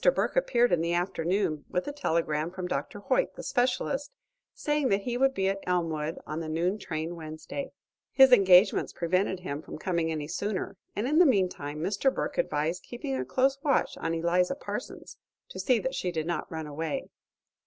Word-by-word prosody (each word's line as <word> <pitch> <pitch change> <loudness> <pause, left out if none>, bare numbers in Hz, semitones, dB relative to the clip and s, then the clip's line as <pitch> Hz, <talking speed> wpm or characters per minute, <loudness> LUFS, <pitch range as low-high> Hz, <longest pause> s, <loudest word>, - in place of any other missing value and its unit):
Burke - - 0
appeared 245 - +3
in 175 -2 +3
the 170 +1 0
afternoon 175 -2 0
with 180 - -2
a - - -1
telegram 165 - 0
from 185 0 -5
Dr. 180 +6 -3
Hoyt, - - +1
the - - -8
specialist, 270 +2 0 0.4
saying 295 -3 0
that 195 0 +1
he 240 +2 -2
would 270 +2 +2
be 190 0 +1
at 195 0 0
Elmwood 165 -3 -1
on 155 +2 -4
the 160 -1 -4
noon 175 +6 0
train 160 -2 -4
Wednesday. 160 - -6 0.4
His 265 -1 +7
engagements 190 -3 +6
prevented 185 +2 0
him 145 -5 -4
from - - -8
coming 170 -1 -1
any 150 -2 -3
sooner, 195 +3 -3 0.2
and 210 - -1
in 305 +4 +3
the 360 - +8
meantime 180 - 0
Mr. 205 +9 +1
Burke - - -3
advised 170 - 0
keeping 235 - -5
a 130 - -1
close 265 - +1
watch 285 -2 +1
on 165 +1 -2
Eliza 175 +7 +1
Parsons, - - -7 0.3
to - - -8
see 255 -3 +3
that 260 +4 -2
she 180 - -2
did 160 -2 -2
not 170 +1 -3
run 160 -1 -4
away. 150 +1 -3
180 Hz, 185 wpm, -28 LUFS, 160-245 Hz, 0.4 s, the